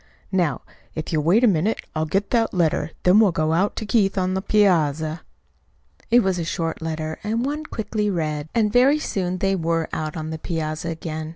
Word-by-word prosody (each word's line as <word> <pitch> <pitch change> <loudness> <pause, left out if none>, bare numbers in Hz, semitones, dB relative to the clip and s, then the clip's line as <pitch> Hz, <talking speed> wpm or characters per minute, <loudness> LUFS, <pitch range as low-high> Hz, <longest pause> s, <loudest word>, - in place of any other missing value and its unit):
"Now, 180 -5 0 0.3
if 155 +1 -4
you'll 155 - +2
wait 180 +10 +3
a - - +7
minute 195 +2 +1 0.2
I'll 155 0 -1
get 195 +5 -1
that 230 -4 +1
letter, 160 -3 +1
then 185 +4 +6
we'll 210 -4 +5
go 160 -1 0
out 190 +5 +1
to 220 - -4
Keith 205 -3 +2
on 185 0 +1
the 190 - -1
piazza." 160 -7 +2 0.9
It 240 +1 +6
was 190 -4 0
a - - -1
short 165 -1 -3
letter, 160 -1 -4
and 225 +4 -1
one 300 +2 -3
quickly 210 -4 -2
read; 155 -4 -2
and 215 -2 +2
very 265 +4 +5
soon 185 -10 -2
they 195 +1 +1
were 165 -2 0
out 155 0 -3
on 155 0 -4
the 160 - -5
piazza 160 0 -3
again. 160 -1 -5
180 Hz, 200 wpm, -22 LUFS, 160-210 Hz, 0.9 s, a